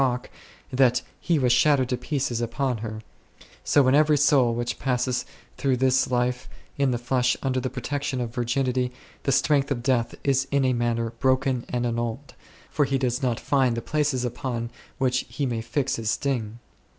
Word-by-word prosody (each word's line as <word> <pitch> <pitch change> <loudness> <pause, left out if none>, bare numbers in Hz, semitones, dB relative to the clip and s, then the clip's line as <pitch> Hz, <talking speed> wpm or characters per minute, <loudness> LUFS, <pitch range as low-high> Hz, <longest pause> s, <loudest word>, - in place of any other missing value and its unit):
rock, 125 -2 0 0.4
that 125 -1 +3 0.2
he 170 - +1
was 125 -4 +3
shattered 130 +1 +4
to 125 - 0
pieces 125 -4 -2
upon 120 +1 -1
her, 110 0 -6 0.6
so 140 -3 +4
in 130 - +4
every 150 +1 +5
soul 135 -4 +4
which 120 0 -3
passes 125 -1 -1 0.3
through 135 -2 +1
this 130 0 +2
life 125 0 -1 0.3
in 140 -1 +2
the 125 - 0
flesh 125 +1 +1
under 130 -1 0
the 130 - -2
protection 135 +2 -3
of 120 -2 -3
virginity, 125 0 0 0.3
the 135 - 0
strength 140 +1 +2
of 125 -4 -2
death 120 -3 +1
is 135 -1 +1
in 140 -1 +2
a 130 - +2
manner 115 -1 0
broken 130 -1 +1
and 120 0 -1
annulled, 120 +3 -3 0.4
for 145 - +2
he 135 0 0
does 125 0 -1
not 125 -3 0
find 130 -4 +1
the - - +1
places 145 -2 0
upon 120 -1 -4 0.3
which 130 -2 +1
he 120 +4 -2
may 120 -3 -2
fix 130 +4 -1
his 110 -1 -2
sting. 115 -5 -1
125 Hz, 180 wpm, -25 LUFS, 120-135 Hz, 0.6 s, every